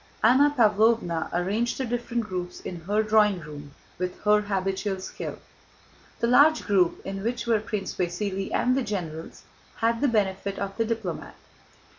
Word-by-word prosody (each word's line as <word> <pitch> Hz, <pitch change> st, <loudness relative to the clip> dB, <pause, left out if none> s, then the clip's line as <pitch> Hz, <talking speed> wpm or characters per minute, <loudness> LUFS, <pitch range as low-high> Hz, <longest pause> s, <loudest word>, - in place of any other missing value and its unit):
Anna 260 Hz, +6 st, +6 dB
Pávlovna 215 Hz, -6 st, +3 dB
arranged 200 Hz, +7 st, 0 dB
the 265 Hz, -, -2 dB
different 240 Hz, 0 st, -2 dB
groups 180 Hz, -3 st, -5 dB
in 180 Hz, -, -7 dB
her 210 Hz, +2 st, +2 dB
drawing 210 Hz, -3 st, +3 dB
room 145 Hz, -2 st, -10 dB, 0.2 s
with 180 Hz, 0 st, -3 dB
her 210 Hz, 0 st, +4 dB
habitual 195 Hz, -1 st, -2 dB
skill. 185 Hz, -, -6 dB, 0.8 s
The -, -, +3 dB
large 285 Hz, +6 st, +5 dB
group, 185 Hz, -5 st, +2 dB
in 195 Hz, 0 st, -4 dB
which 235 Hz, +1 st, -2 dB
were 230 Hz, -2 st, +3 dB
Prince 210 Hz, -2 st, -4 dB
Vasíli 195 Hz, +2 st, -2 dB
and 250 Hz, +1 st, +2 dB
the 270 Hz, -, +1 dB
generals, 175 Hz, -8 st, -5 dB, 0.3 s
had 230 Hz, 0 st, 0 dB
the 285 Hz, -, +4 dB
benefit 200 Hz, -3 st, 0 dB
of 195 Hz, 0 st, -4 dB
the 225 Hz, -, +1 dB
diplomat. 220 Hz, -6 st, -4 dB
210 Hz, 155 wpm, -26 LUFS, 185-230 Hz, 0.8 s, Anna